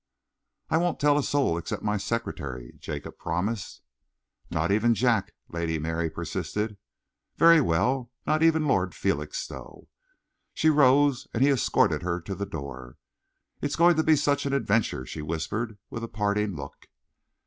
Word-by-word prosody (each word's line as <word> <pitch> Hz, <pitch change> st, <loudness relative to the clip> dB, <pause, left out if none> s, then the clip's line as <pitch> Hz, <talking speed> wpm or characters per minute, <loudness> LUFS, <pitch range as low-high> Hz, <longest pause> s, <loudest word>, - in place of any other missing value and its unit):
"I 160 Hz, -, +4 dB
won't 175 Hz, +1 st, 0 dB
tell 145 Hz, 0 st, +4 dB
a -, -, +2 dB
soul 135 Hz, -12 st, +1 dB
except 85 Hz, -, -5 dB
my 105 Hz, 0 st, 0 dB
secretary," 70 Hz, -, -4 dB
Jacob -, -, -7 dB
promised. 100 Hz, +4 st, -3 dB, 0.7 s
"Not -, -, 0 dB
even 115 Hz, +3 st, +3 dB
Jack," 120 Hz, -5 st, +1 dB, 0.2 s
Lady 85 Hz, -1 st, -2 dB
Mary 80 Hz, +1 st, -2 dB
persisted. 105 Hz, +5 st, -3 dB, 0.6 s
"Very 165 Hz, -1 st, +7 dB
well. 120 Hz, -, +1 dB, 0.2 s
Not 155 Hz, +1 st, +1 dB
even 160 Hz, -1 st, +4 dB
Lord -, -, +1 dB
Felixstowe." -, -, -4 dB, 0.7 s
She 160 Hz, -, +4 dB
rose, 140 Hz, -2 st, +4 dB
and 120 Hz, -, +3 dB
he 140 Hz, -, +5 dB
escorted 130 Hz, -5 st, +2 dB
her 85 Hz, 0 st, -2 dB
to 85 Hz, +4 st, -6 dB
the 100 Hz, +2 st, -4 dB
door. 70 Hz, -8 st, -8 dB, 0.6 s
"It's 145 Hz, -, -1 dB
going 170 Hz, +1 st, +5 dB
to 160 Hz, -, +2 dB
be 155 Hz, 0 st, +5 dB
such 145 Hz, -1 st, +1 dB
an 140 Hz, -, -1 dB
adventure," 110 Hz, -, +1 dB
she 75 Hz, -, -6 dB
whispered, 100 Hz, +8 st, -3 dB
with 115 Hz, -, -5 dB
a -, -, -3 dB
parting 105 Hz, -2 st, -1 dB
look. 75 Hz, -, -9 dB
110 Hz, 150 wpm, -27 LUFS, 85-145 Hz, 0.7 s, Very